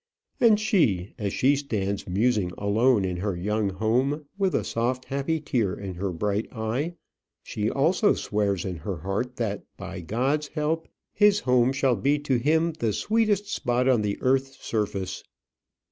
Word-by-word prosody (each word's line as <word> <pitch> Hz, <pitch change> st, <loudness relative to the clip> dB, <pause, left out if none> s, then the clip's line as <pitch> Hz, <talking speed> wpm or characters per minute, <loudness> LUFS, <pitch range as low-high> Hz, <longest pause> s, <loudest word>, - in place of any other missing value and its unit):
And 220 Hz, -3 st, +5 dB
she, 155 Hz, -, +1 dB
as 100 Hz, -2 st, -1 dB
she 135 Hz, +7 st, +3 dB
stands 100 Hz, -8 st, -2 dB
musing 100 Hz, -1 st, +1 dB
alone 105 Hz, +1 st, +3 dB
in 90 Hz, -1 st, -2 dB
her 100 Hz, +1 st, -2 dB
young 105 Hz, +3 st, 0 dB
home, 125 Hz, +10 st, 0 dB
with 195 Hz, -2 st, 0 dB
a -, -, +1 dB
soft 125 Hz, +2 st, -1 dB
happy 140 Hz, +4 st, -1 dB
tear 120 Hz, -10 st, 0 dB
in 95 Hz, -2 st, -6 dB
her 95 Hz, +2 st, -3 dB
bright 105 Hz, +5 st, -2 dB
eye, 125 Hz, +9 st, -2 dB, 0.5 s
she 105 Hz, 0 st, -2 dB
also 175 Hz, -, +3 dB
swears 100 Hz, -4 st, -1 dB
in 90 Hz, -3 st, -3 dB
her 90 Hz, +4 st, -4 dB
heart 100 Hz, +10 st, -3 dB
that, 105 Hz, -4 st, -2 dB, 0.2 s
by 95 Hz, -1 st, -7 dB
God's 130 Hz, -, 0 dB
help, 155 Hz, +2 st, -2 dB, 0.3 s
his 205 Hz, 0 st, +4 dB
home 125 Hz, 0 st, +3 dB
shall 135 Hz, -2 st, +2 dB
be 140 Hz, +9 st, +2 dB
to 145 Hz, -3 st, 0 dB
him 160 Hz, +6 st, +2 dB
the 115 Hz, -9 st, -2 dB
sweetest 210 Hz, -, +1 dB
spot 125 Hz, -, 0 dB
on 125 Hz, -4 st, +4 dB
the 100 Hz, -1 st, -1 dB
earth's 135 Hz, +1 st, +1 dB
surface. 100 Hz, -4 st, -2 dB
120 Hz, 160 wpm, -26 LUFS, 100-145 Hz, 0.5 s, And